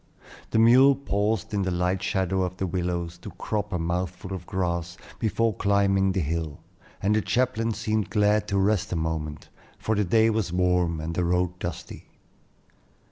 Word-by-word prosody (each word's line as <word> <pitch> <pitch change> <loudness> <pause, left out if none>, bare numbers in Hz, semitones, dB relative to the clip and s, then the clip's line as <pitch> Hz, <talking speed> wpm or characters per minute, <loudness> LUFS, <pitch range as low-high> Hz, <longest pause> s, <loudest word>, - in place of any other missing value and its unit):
The - - 0
mule 130 +5 +7
paused 105 -6 -1
in 100 - +1
the 95 - 0
light 90 +1 0
shadow 95 0 0
of 90 0 -2
the 95 - -1
willows, 85 -1 -3
to 90 - -8
crop 105 +3 -3
a 90 - 0
mouthful 90 +3 -3
of 90 -2 -7
grass 85 -2 -2 0.2
before 115 0 +1
climbing 100 -1 +2
the 95 - 0
hill, 80 -1 -3 0.4
and 105 +2 +3
the 110 - +2
chaplain 115 +1 0
seemed 110 -1 -1
glad 105 0 +2
to 100 - 0
rest 100 0 +1
a - - 0
moment, 80 -2 -3 0.3
for 110 - -1
the 105 -1 +1
day 110 +4 +3
was 110 -5 -1
warm 90 -2 +1
and 80 +2 -4
the 90 - 0
road 90 +1 0
dusty. 85 -2 -6
95 Hz, 175 wpm, -26 LUFS, 85-105 Hz, 0.4 s, mule